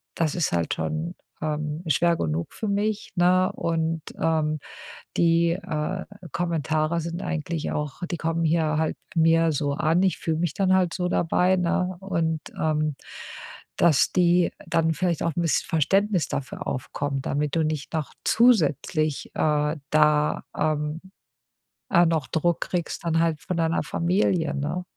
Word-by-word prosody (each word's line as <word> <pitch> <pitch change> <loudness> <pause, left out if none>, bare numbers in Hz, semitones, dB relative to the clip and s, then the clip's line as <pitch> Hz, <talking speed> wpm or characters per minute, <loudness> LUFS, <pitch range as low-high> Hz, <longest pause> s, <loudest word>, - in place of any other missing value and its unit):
das 160 -1 0
ist 175 - 0
halt 85 -2 0
schon, 165 +3 -3 0.3
ähm, 150 +1 -3
schwer 170 +3 +3
genug 80 +1 -2
für 220 - -4
mich, 205 +1 -1
ne, 185 +1 +3
und, 165 -1 -1 0.2
ähm, 155 -2 +1 0.6
die, 170 0 +3
äh, 175 +1 -3 0.3
Kommentare 160 -1 0
sind 170 +2 -5
eigentlich 160 0 -3
auch 150 0 -4
die 175 - -1
kommen 165 0 -1
hier 155 -1 +2
halt 160 0 0 0.2
mir 165 0 +4
so 145 -1 -1
an. 165 +5 +2
Ich 190 -2 +1
fühle 160 -1 -1
mich 170 -2 -1
dann 190 -2 +2
halt 180 -3 +2
so 180 -1 -1
dabei, 180 +2 +2
ne?“ 180 +1 0
Und, 165 -5 -1 0.2
ähm, 155 -2 0 0.8
dass 155 -5 +4
die 175 -1 +3 0.2
dann 165 -1 +2
vielleicht 175 -1 0
auch 170 - 0
'n - - +1
bisschen 165 - +1
Verständnis 190 +2 +2
dafür 135 - -5
aufkommen, 135 +1 -3
damit 145 +2 -1
du 160 - +3
nicht 155 -1 -3
noch 155 -3 -2
zusätzlich, 155 - +2
äh, 150 0 +1
da, 150 -1 +3
ähm, 150 +1 -1 0.9
äh, 175 0 +6
noch 160 -4 0
Druck 170 +1 0
kriegst 175 -1 -3
dann 165 0 +2
halt 165 -2 +1
von 185 - -3
deiner 165 0 +1
Familie, 170 0 +1
ne? 150 +6 -2
165 Hz, 150 wpm, -25 LUFS, 155-175 Hz, 0.9 s, äh